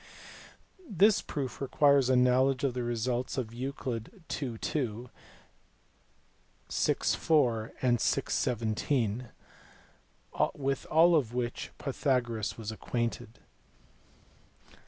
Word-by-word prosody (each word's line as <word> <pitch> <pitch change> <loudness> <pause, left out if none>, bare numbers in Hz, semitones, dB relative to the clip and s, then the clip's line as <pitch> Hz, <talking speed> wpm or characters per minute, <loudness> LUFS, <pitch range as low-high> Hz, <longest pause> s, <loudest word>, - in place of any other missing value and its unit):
This 205 +1 +4
proof 140 -3 -5
requires 140 -1 +3
a 130 - +4
knowledge 130 +2 +3
of 135 -3 +1
the 125 - -3
results 120 +2 -2
of 125 -4 -2
Euc. 130 +5 -6
11. 125 - -5 0.4
2, 125 -4 -3 1.6
vi. - - +2
4, 120 -8 +1
and 120 -2 +3
vi. - - +2
17, 115 0 -1 1.3
with 135 -1 -2
all 170 +2 +6
of 125 -6 0
which 120 -1 -3
Pythagoras 125 -6 -1
was 110 -1 -5
acquainted. 115 0 -3
125 Hz, 95 wpm, -30 LUFS, 115-140 Hz, 1.6 s, all